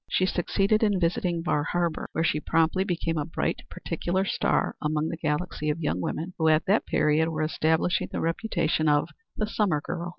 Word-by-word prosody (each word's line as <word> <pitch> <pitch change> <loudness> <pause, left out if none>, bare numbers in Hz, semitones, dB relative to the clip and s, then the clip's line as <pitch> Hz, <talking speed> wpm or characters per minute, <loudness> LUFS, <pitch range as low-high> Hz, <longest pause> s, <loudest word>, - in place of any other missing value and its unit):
She 185 - +2
succeeded 195 +4 +1
in 205 -4 +2
visiting 175 -1 0
Bar 150 -4 +1
Harbor, 170 0 -1
where 165 - 0
she 155 - +1
promptly 165 +4 +2
became 165 -4 -1
a 145 - -1
bright 160 - -2
particular 185 +2 -2
star - - 0
among 155 +1 0
the - - -3
galaxy 155 0 -2
of 150 +2 -1
young 120 - -1
women 165 - -3
who 160 - +2
at 155 0 +4
that 200 +4 +2
period 155 +2 +2
were 155 -1 -2
establishing 160 +2 +1
the - - -3
reputation 165 -3 0
of 145 0 +2 0.3
the 215 - 0
summer 205 -7 +1
girl. 170 +3 -5
165 Hz, 190 wpm, -26 LUFS, 155-180 Hz, 0.3 s, at